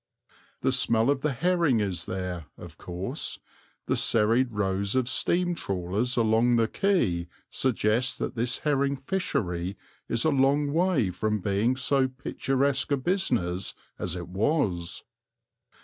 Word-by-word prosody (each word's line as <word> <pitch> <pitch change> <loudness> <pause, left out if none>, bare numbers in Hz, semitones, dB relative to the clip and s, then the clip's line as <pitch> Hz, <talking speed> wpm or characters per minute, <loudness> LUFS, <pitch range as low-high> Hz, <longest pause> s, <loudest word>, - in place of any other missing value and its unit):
The - - +2
smell 115 +3 +3
of 140 -2 -1
the 150 - +1
herring 165 -2 +2
is 95 -4 -2
there, 90 -4 -4
of - - -11
course; 90 +2 -3 0.5
the - - +1
serried 115 +3 +2
rows 100 0 -1
of 130 -2 +2
steam 175 +6 +1
trawlers 100 - -2
along 115 +1 +3
the 115 -1 +3
quay 110 - +1 0.2
suggest 120 0 +1
that - - -3
this 120 0 0
herring 140 -1 +2
fishery 100 - -2 0.3
is 115 - +1
a 160 - +4
long 140 +1 +2
way 165 - +2
from 105 +4 -1
being 100 +6 +1
so 135 0 +2
picturesque 135 +1 -1
a 140 - +3
business 120 - -1 0.2
as 90 -1 -2
it 85 -1 -6
was. 95 - -1
120 Hz, 135 wpm, -27 LUFS, 95-140 Hz, 0.5 s, a